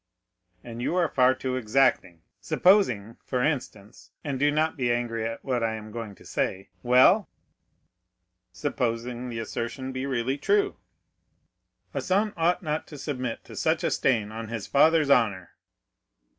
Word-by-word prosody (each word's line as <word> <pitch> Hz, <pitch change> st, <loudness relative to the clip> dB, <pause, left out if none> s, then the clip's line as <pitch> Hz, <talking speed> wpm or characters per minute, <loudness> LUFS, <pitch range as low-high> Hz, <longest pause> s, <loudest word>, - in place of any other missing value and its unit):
"And 120 Hz, 0 st, -8 dB
you 165 Hz, -, -1 dB
are 175 Hz, -2 st, +3 dB
far 130 Hz, -1 st, +3 dB
too 130 Hz, -1 st, -3 dB
exacting. 110 Hz, -8 st, +1 dB, 0.2 s
Supposing, 125 Hz, -, +2 dB
for 125 Hz, -2 st, -1 dB
instance, 120 Hz, -8 st, -4 dB
and 140 Hz, -3 st, -3 dB
do 145 Hz, +2 st, +3 dB
not 155 Hz, +2 st, +1 dB
be 125 Hz, -5 st, 0 dB
angry 115 Hz, -2 st, -1 dB
at 115 Hz, -, -7 dB
what 125 Hz, -3 st, 0 dB
I 110 Hz, -1 st, 0 dB
am 110 Hz, 0 st, -9 dB
going 110 Hz, -3 st, -6 dB
to -, -, -18 dB
say——" 95 Hz, +1 st, -2 dB
"Well." 130 Hz, -, +5 dB, 1.2 s
"Supposing 125 Hz, -1 st, -3 dB
the 115 Hz, -, -5 dB
assertion 115 Hz, +4 st, -4 dB
to -, -, -6 dB
be 130 Hz, +1 st, -3 dB
really 130 Hz, +1 st, -1 dB
true?" 405 Hz, -, +1 dB, 1.2 s
"A -, -, -2 dB
son 205 Hz, +3 st, +1 dB
ought 175 Hz, +3 st, +1 dB
not 155 Hz, -1 st, -2 dB
to 150 Hz, -, -10 dB
submit 130 Hz, -5 st, -4 dB
to -, -, -12 dB
such -, -, 0 dB
a -, -, +1 dB
stain 110 Hz, -5 st, +1 dB
on 110 Hz, +1 st, -6 dB
his 110 Hz, -2 st, -5 dB
father's 155 Hz, 0 st, +4 dB
honor." 105 Hz, -9 st, +2 dB
125 Hz, 155 wpm, -26 LUFS, 115-145 Hz, 1.2 s, Well